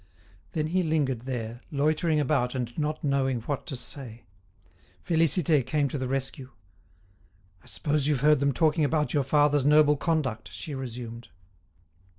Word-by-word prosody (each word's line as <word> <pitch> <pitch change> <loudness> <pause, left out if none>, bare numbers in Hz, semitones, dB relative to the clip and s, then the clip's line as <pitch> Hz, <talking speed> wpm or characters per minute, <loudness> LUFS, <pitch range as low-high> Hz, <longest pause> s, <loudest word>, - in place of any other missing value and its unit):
Then 155 -1 0
he 180 +4 +1
lingered 150 -7 0
there, 120 -2 -4
loitering 155 +2 +1
about 135 -4 0
and 120 -2 -3
not 155 0 -2
knowing 135 -4 0
what 140 +7 -4
to 145 - -4
say. 120 -2 -6 0.8
Félicité 160 -3 +3
came 145 +3 0
to 140 - -4
the 130 - -2
rescue. 135 0 -3 1.1
"I - - -22
suppose 150 -2 -1
you've 145 -4 +1
heard 150 0 +5
them 140 0 +2
talking 155 +3 +2
about 150 +1 0
your 145 -3 +2
father's 145 +1 +3
noble 150 0 +5
conduct?" 130 - -1
she 100 - -7
resumed. 120 -3 -7
140 Hz, 150 wpm, -27 LUFS, 130-155 Hz, 1.1 s, heard